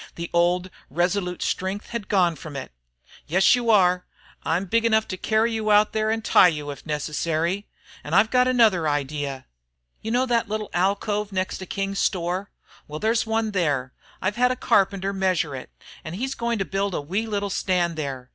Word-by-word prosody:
The 170 0 -6
old, 175 +2 +2 0.2
resolute 180 +4 -1
strength 190 +3 -3
had 235 -4 -4
gone 180 -4 +3
from 150 0 -9
it. 135 - -6 0.6
"Yes, 185 +5 +4
you 240 -2 -2
are. 180 -4 +4 0.3
I'm 175 +4 -1
big 230 +5 +1
enough 220 -1 +2
to 185 - -2
carry 220 +4 +1
you 220 -1 -1
out 210 0 +4
there 215 0 0
and 225 0 -1
tie - - +7
you 150 -4 -2
if 140 - -11
necessary. 160 +5 -1 0.4
Then 150 +3 -2
I've 210 +3 +4
got 250 0 +4
another 220 -11 +3
idea. 145 -2 -3 0.6
You 220 - -5
know 245 +3 +2
that 235 -4 0
little 215 0 -3
alcove 200 +3 0
next 185 -1 -2
to 185 - -8
King's 195 +1 -3
store? 180 +2 -1 0.4
Well, 150 - -6
there's 225 +2 +1
one 220 -1 0
there. 145 -9 0 0.3
I've 205 +4 -1
had 250 +1 +4
a - - 0
carpenter 195 -4 +1
measure 185 -7 0
it, 130 - -8 0.3
and 165 0 -6
he's 265 +6 -2
going 235 -2 -1
to 195 - -1
build 195 -1 -2
a - - -1
wee 195 +10 -2
little 205 -2 -2
stand 175 -3 0
there. 135 -5 -5
190 Hz, 190 wpm, -24 LUFS, 170-215 Hz, 0.6 s, tie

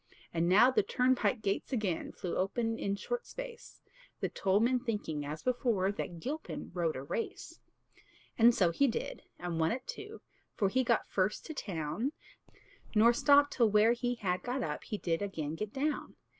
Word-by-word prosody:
And 170 +1 +1
now 220 +8 +7
the - - +4
turnpike 250 -4 +1
gates 200 +6 -1
again 210 -9 -1
Flew 180 - -4
open 225 +4 -1
in 200 0 -1
short 485 - -4
space; - - -9 0.4
The - - -1
toll 195 +1 +1
men 250 +3 +3
thinking, 210 - -3
as 150 +2 -6
before, 235 -6 +1
That 175 -4 -5
Gilpin 295 - -5
rode 170 -3 0
a 130 - -5
race. 230 +11 -5 0.8
And 235 +1 +6
so 175 -4 +3
he 280 +11 +3
did, 230 - -3 0.2
and 175 -2 -3
won 160 0 +2
it 255 +1 -3
too, 420 +2 -8 0.3
For 200 -4 +2
he 260 +6 +2
got 235 -1 +1
first 195 +2 0
to 315 - -6
town; 185 - -3 0.8
Nor 230 +3 +6
stopped 285 +3 +5
till 235 -3 +4
where 210 +2 +5
he 245 0 -1
had 185 -5 -1
got 250 +1 -2
up - - -4
He 215 - -3
did 165 -3 -1
again 160 -7 -3
get 205 +5 -4
down. 290 +4 -2
215 Hz, 180 wpm, -32 LUFS, 180-255 Hz, 0.8 s, now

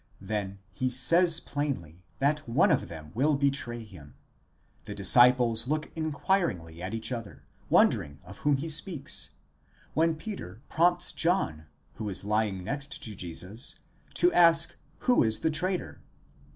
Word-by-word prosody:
Then 100 -1 -4
he 130 -1 -1
says 165 +7 +3
plainly, 90 - -4
that 150 0 0
one 115 - +4
of - - +1
them 80 -2 -10
will 145 +7 +2
betray 135 -4 -1
him; 85 -10 -14 0.7
the - - -6
disciples 120 -2 +5
look 155 +2 -2
inquiringly 145 - -1
at 95 +5 -4
each 115 +3 -3
other, 115 -4 -6 0.3
wondering 70 0 +3
of 95 +3 -12
whom 145 -2 +2
he 150 +5 -4
speaks, 150 - -1 0.6
when 165 +1 +2
Peter 155 - -7
prompts 175 +2 +2
John, 120 - 0 0.3
who 110 -2 -3
is 95 0 -3
lying 105 -3 0
next 140 +7 -5
to 110 -3 -6
Jesus, 95 +7 -6 0.4
to 355 0 +3
ask 165 -1 +5 0.3
who 250 -1 +4
is 110 -1 +2
the 160 - +1
traitor? 180 +4 -2
125 Hz, 140 wpm, -28 LUFS, 100-155 Hz, 0.7 s, disciples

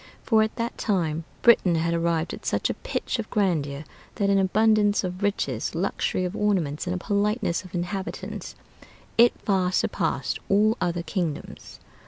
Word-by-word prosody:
For 220 -3 +4
at 220 0 0
that 230 +1 -3
time 165 -6 0 0.2
Britain 200 -7 +5
had 165 +1 0
arrived 170 0 0
at - - -8
such - - 0
a - - -9
pitch - - -2
of 220 - -4
grandeur, 155 -8 0 0.3
that 200 -1 +1
in 195 - +4
abundance 210 +2 +3
of 180 +1 -4
riches, 150 - -1
luxury 185 +1 -1
of 180 +3 -4
ornaments, 180 -7 0
and 180 +1 -1
politeness 205 -1 0
of 185 -1 -10
inhabitants, 190 +3 -4 0.6
it 240 +1 +6
far 185 -3 +1
surpassed - - -1
all 215 +3 +4
other 175 -1 -1
kingdoms. 160 -2 -4
185 Hz, 155 wpm, -25 LUFS, 170-210 Hz, 0.6 s, it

